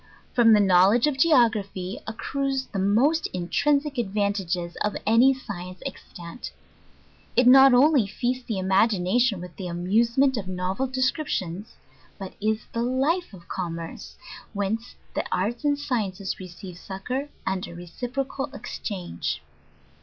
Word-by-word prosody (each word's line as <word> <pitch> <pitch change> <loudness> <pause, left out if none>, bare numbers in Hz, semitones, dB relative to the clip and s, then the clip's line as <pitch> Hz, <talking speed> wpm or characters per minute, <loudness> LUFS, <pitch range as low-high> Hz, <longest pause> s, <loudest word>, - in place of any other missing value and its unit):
From 235 -2 +6
the 210 - +6
!;nr.wledgG 195 +4 +5
of 290 -3 -1
Geography 215 - +2
accrues 270 +4 -2
the 195 - -1
most 245 +12 +2
in 175 -1 -3
trinsic 290 -2 +1
advantages 195 -5 -1
of 210 - -1
any 230 +5 +6
Science 185 -8 -7
extant. 170 +7 -8 0.8
It 250 - +4
not 265 +1 +8
only 270 -4 +5
feasts 245 +4 -2
the 220 -5 -2
imagination 195 +3 +2
with 180 0 -9
the 185 - -5
amusement 230 +10 +2
of 200 -3 -4
nov'el 185 +7 -2
descriptions; 255 - -2 0.4
but 190 -1 -7
is 215 +1 0
the 230 - -2
Jife 270 +9 0
of 180 -4 -14
commerce, 165 -2 -6 0.4
whcr.ce 210 +4 -2 0.2
the - - -1
arts 215 +9 -1
and 290 -1 +2
sciences 210 -9 -3
re 185 - -7
ceive 180 0 -10
succour, 250 +11 -4 0.2
and 190 -1 -2
a 170 - -10
reciprocal 250 - -4
exchange. 180 - -4
215 Hz, 135 wpm, -25 LUFS, 185-260 Hz, 0.8 s, not